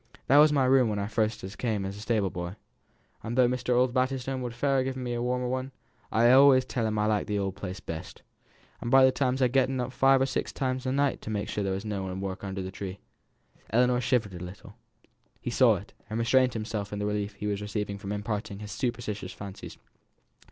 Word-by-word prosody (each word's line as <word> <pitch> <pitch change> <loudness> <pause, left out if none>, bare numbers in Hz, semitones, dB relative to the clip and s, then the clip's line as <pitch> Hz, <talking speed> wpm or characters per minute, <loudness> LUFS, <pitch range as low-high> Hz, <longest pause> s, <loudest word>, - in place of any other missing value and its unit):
That 140 +3 +6
were 150 - +9
my 140 -3 +3
room 130 -2 +4
when 100 -1 -2
first 110 0 -1
I 95 - -5
come 105 -1 -2
as 95 +1 -5
stable 105 -3 0
boy, 90 +2 -5 0.7
and 115 +3 -4
tho' 125 -1 +6
Mr. 125 0 0
Osbaldistone 130 +1 0
would 120 -2 -5
fain 135 +1 +2
give 130 0 -3
me 125 -2 -3
a 120 - -2
warmer 125 +1 -1
one, 130 +1 -3 0.4
I 110 +2 +2
allays 130 +1 +7
tell 115 -3 -1
him 110 0 -1
I 105 - +2
like 105 -1 +1
th' 105 - -1
old 95 -1 -2
place 95 0 -6
best. 80 -3 -8 0.6
And 120 - -3
by 130 +1 +7
times 130 0 0
I've 125 - +3
getten 130 0 +2
up 125 0 -2
five 135 +1 +4
or 135 - +3
six 135 - -2
times 130 -1 -2
a - - +1
night 140 +1 +1
to - - -7
make 105 -2 -2
sure 105 - -2
as - - -1
there 95 - 0
was 95 +3 -4
no 105 -2 -3
one 95 -1 -4
at - - -5
work 95 0 -5
under 95 -1 -4
the 95 - -5
tree." 95 -1 -6 0.7
Ellinor 125 +2 +3
shivered 120 -6 +1
a 90 0 -7
little. 90 +2 -10 0.7
He - - -4
saw - - +5
it, - - -9 0.2
and 110 - -3
restrained 125 +2 +3
himself 110 -2 -4
in 105 - -4
the 105 - -2
relief 105 0 -2
he 100 - -7
was 105 -1 -1
receiving 105 -1 -3
from 100 0 -6
imparting 105 -1 -3
his 105 0 -8
superstitious 115 -7 -3
fancies. 100 -1 -9
115 Hz, 230 wpm, -28 LUFS, 100-130 Hz, 0.7 s, were